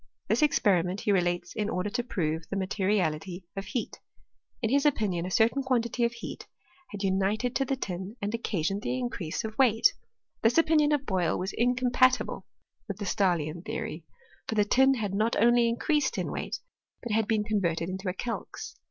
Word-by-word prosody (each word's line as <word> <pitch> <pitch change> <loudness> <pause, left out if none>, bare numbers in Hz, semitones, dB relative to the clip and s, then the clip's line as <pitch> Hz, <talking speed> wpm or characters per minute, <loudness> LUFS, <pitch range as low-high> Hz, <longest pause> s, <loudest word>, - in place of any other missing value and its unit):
This - - +2
experi 205 - +4
ment 180 +3 -4
he 210 - +1
relates 175 -2 0
in 210 -1 -1
order 195 +1 -2
to 245 +1 -1
prove 165 -7 -2
the - - -3
materiality 185 -3 -1
of 195 0 -4
heat: 230 +5 -4 0.6
in 225 -3 -1
his 280 +1 +3
opinion 205 - +1
a - - -4
certain 225 +8 +3
quantity 245 -2 0
of 235 - +1
heat 235 - -8 0.4
had 205 -3 -4
upited 200 +6 0
to 270 - +2
the 270 - 0
tin 190 -3 -5
and 205 +1 -3
occasioned 195 -4 -1
the 250 - -2
increase 240 -8 -3
of 220 0 -5
weight. 230 -4 +5 0.5
This 225 +5 +3
opinion 310 -2 +4
of 290 -2 +1
Boyle 185 -6 +1
was 190 +1 -3
incompatible 250 +1 +2 0.4
with 200 -3 -4
the 205 - -5
Stah 190 -2 +2
lian 155 +2 -5
theory: - - -5 0.4
for 220 - -2
the 210 -1 +3
tin 265 +5 +4
had 210 -5 -3
not 220 +4 +1
only 235 +1 +5
increased 290 +4 0
in - - -2
weight, - - -4 0.4
but 240 - -4
had 220 0 +2
been 215 -2 +1
converted 175 -6 0
into 190 +1 -3
a - - -2
calx. 235 +3 -5
210 Hz, 185 wpm, -28 LUFS, 185-240 Hz, 0.6 s, weight